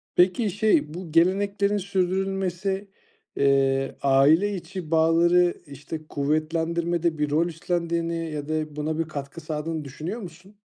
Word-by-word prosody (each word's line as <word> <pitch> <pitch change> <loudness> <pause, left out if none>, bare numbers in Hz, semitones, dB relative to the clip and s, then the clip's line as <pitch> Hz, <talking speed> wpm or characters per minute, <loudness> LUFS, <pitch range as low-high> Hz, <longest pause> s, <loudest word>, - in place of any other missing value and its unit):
Peki, 190 +5 +3
şey 175 -8 +2
bu 175 -2 -7
geleneklerin 200 +4 +2
sürdürülmesi, 195 0 -1 0.5
eee, 135 -1 +2
aile 150 +9 +4
içi 180 -2 -7
bağları, 170 +2 +4
işte, 150 +2 -8
kuvvetlendirmede 165 +3 0
bir 150 0 0
rol 160 +4 +2
üstlendiğini 170 -1 -2
ya 145 -1 -5
da 155 -1 -2
buna 155 +1 -2
bir - - +2
katkı 145 +1 -7
sağladığını 155 0 -4
düşünüyor 160 - -5
musun? 185 +3 -12
165 Hz, 125 wpm, -25 LUFS, 155-185 Hz, 0.5 s, aile